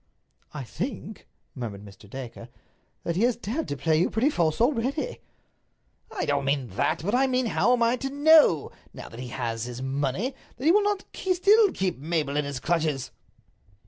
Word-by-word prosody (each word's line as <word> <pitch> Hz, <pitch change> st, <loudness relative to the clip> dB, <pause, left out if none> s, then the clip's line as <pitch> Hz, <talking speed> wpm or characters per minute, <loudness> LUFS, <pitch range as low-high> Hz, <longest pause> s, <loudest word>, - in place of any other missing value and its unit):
"I 145 Hz, -3 st, -6 dB
think," 215 Hz, -, -6 dB, 0.3 s
murmured 105 Hz, -6 st, -6 dB
Mr. 100 Hz, 0 st, -14 dB
Dacre, 130 Hz, 0 st, -8 dB, 0.5 s
"that 170 Hz, -, -2 dB
he 185 Hz, -, 0 dB
has 240 Hz, 0 st, +3 dB
dared 240 Hz, +8 st, -4 dB
to 145 Hz, -, -4 dB
play 155 Hz, +1 st, +2 dB
you 175 Hz, -, +2 dB
pretty 255 Hz, +7 st, +1 dB
false 160 Hz, -, 0 dB
already." 265 Hz, -, 0 dB, 0.9 s
"I -, -, -2 dB
don't 140 Hz, -1 st, 0 dB
mean 135 Hz, -3 st, 0 dB
that. 100 Hz, -, -1 dB
But 205 Hz, +5 st, -1 dB
I 265 Hz, +2 st, +4 dB
mean 255 Hz, -1 st, +1 dB
how 230 Hz, +1 st, +2 dB
am 245 Hz, -1 st, +3 dB
I 235 Hz, +2 st, +2 dB
to 270 Hz, +2 st, -3 dB
know, 290 Hz, -, +5 dB, 0.2 s
now -, -, -9 dB
that 115 Hz, -, -11 dB
he 125 Hz, -, -5 dB
has 120 Hz, -2 st, -3 dB
his 125 Hz, +1 st, -6 dB
money, 140 Hz, -, -1 dB, 0.2 s
that 255 Hz, -, -6 dB
he 325 Hz, -, +7 dB
will 410 Hz, +1 st, +3 dB, 0.2 s
still 400 Hz, +4 st, +4 dB
not -, -, -7 dB
keep 185 Hz, -7 st, -1 dB
Mabel 150 Hz, -2 st, -1 dB
in 150 Hz, 0 st, +1 dB
his 140 Hz, -2 st, -4 dB
clutches?" 155 Hz, -4 st, -1 dB
170 Hz, 185 wpm, -26 LUFS, -, 0.9 s, he